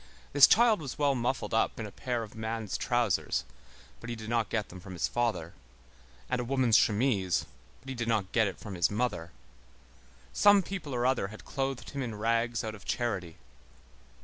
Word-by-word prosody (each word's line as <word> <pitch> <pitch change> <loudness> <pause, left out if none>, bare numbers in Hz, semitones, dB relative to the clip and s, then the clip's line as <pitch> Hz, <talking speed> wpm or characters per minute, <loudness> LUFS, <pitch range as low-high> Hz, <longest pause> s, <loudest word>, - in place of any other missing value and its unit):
This 145 -1 +9
child 225 -4 +5
was 140 -4 -6
well 145 -1 +3
muffled 125 -1 -2
up 115 - +1
in 110 - -3
a 105 - -8
pair 120 +2 -3
of 105 - -10
man's 110 -1 -4
trousers, 120 -7 0 0.6
but 120 - -8
he 120 - -3
did 110 -1 -8
not 115 -2 +1
get 110 -3 -2
them 90 - -10
from 95 0 -10
his 85 - 0
father, 110 -9 -1 0.7
and 125 - -1
a - - -2
woman's 125 -2 +2
chemise, 100 -7 +2 0.4
but 135 - -11
he - - -3
did 120 -2 -3
not 105 -5 0
get 110 -3 +3
it 95 - -5
from 105 - -8
his 85 -1 +2
mother. 105 -6 -2 1.0
Some 205 -1 +6
people 175 -8 -5
or 120 0 0
other 130 -6 +2
had 110 +2 -12
clothed 135 -2 -3
him 140 - -4
in 115 -4 -4
rags 115 +2 0
out 110 -1 -4
of 105 - -12
charity. 95 -9 -2
115 Hz, 195 wpm, -30 LUFS, 105-130 Hz, 1.0 s, This